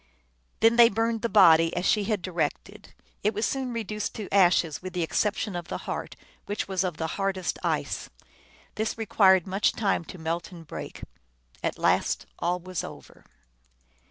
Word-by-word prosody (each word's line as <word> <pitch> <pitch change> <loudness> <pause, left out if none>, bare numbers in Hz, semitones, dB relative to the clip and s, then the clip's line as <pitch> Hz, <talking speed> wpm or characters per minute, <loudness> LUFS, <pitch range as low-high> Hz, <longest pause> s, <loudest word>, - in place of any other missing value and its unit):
Then 225 +1 +5
they 235 -1 +8
burned 225 +1 0
the 235 - -1
body, 165 -5 +6
as 180 +1 -1
she 210 -1 +2
had 210 -4 -1
directed. 185 +4 -4 0.3
It 210 +1 0
was 215 - 0
soon 265 -2 -2
reduced 215 -2 -4
to 210 -3 -6
ashes, 175 -5 +3
with 185 0 -7
the 180 -2 -1
exception 205 +3 -1
of 175 -1 -5
the - - -4
heart, - - -4 0.3
which 205 - -3
was 190 -1 0
of 180 -4 -3
the 160 - -2 0.2
hardest 190 -2 -1
ice. - - -2 0.7
This 220 +1 -1
re 225 - -3
quired 190 -4 +5
much 195 +2 +1
time 200 -5 0
to 185 - -10
melt 165 +1 -3
and 170 -2 -11
break. - - -8 0.6
At - - -2
last - - +1
all 175 +1 0
was 180 -1 -4
over. - - -11
190 Hz, 175 wpm, -27 LUFS, 175-215 Hz, 0.7 s, they